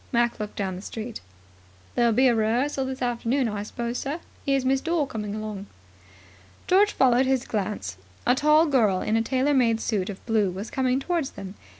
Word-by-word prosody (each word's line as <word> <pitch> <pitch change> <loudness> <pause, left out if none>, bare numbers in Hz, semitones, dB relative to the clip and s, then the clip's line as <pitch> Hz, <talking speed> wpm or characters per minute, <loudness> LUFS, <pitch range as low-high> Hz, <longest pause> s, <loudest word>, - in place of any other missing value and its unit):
Mac 235 -1 +1
looked 210 -1 -5
down 190 -2 -2
the 185 - -7
street. 225 +3 -6 0.7
"There'll 235 -1 +3
be 255 +4 +4
a 245 - +4
rehearsal 245 +5 +1
this 260 0 -4
afternoon, 245 +2 0
I 210 -2 -3
suppose, 235 +3 -4
sir? 290 +5 -3 0.2
Here's 275 -2 +1
Miss 265 +1 +2
Dore 330 -3 0
coming 210 -5 -5
along." 215 -2 -5 1.0
George 405 +3 +4
followed 255 0 +4
his 265 -1 +1
glance. 195 - -3 0.3
A 245 - +5
tall 300 +4 +4
girl 225 - +2
in 215 - 0
a 225 - +3
tailor 265 +4 +1
made 235 -4 +3
suit 205 -4 -1
of 195 - -8
blue 220 -4 +2
was 195 +4 -6
coming 260 0 +1
towards 325 -1 -1
them. 195 -1 -8
240 Hz, 190 wpm, -25 LUFS, 215-265 Hz, 1.0 s, A